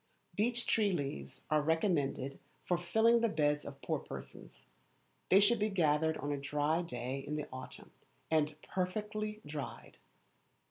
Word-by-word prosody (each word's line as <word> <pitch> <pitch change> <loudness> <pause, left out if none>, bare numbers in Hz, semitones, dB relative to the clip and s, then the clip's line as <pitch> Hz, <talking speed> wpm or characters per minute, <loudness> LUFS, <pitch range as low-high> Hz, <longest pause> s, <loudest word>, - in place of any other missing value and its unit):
Beech 240 +3 +1
tree 210 -3 +3
leaves 145 -5 -4
are 155 0 +4
recommended 150 -4 0 0.3
for 180 - +2
filling 220 +7 +4
the 230 - +3
beds 150 -3 +1
of 140 -1 -9
poor - - 0
persons. - - -10 0.6
They 190 - +8
should 215 +3 +4
be 210 +1 +2
gathered 160 -4 +2
on 145 - -3
a 145 - 0
dry 150 +3 +1
day 130 -4 -4
in 145 +2 -4
the 150 -1 -3
autumn, 130 0 -9 0.4
and 155 -1 +2
perfectly 210 +3 -2
dried. 145 -1 -7
160 Hz, 145 wpm, -34 LUFS, 145-205 Hz, 0.6 s, They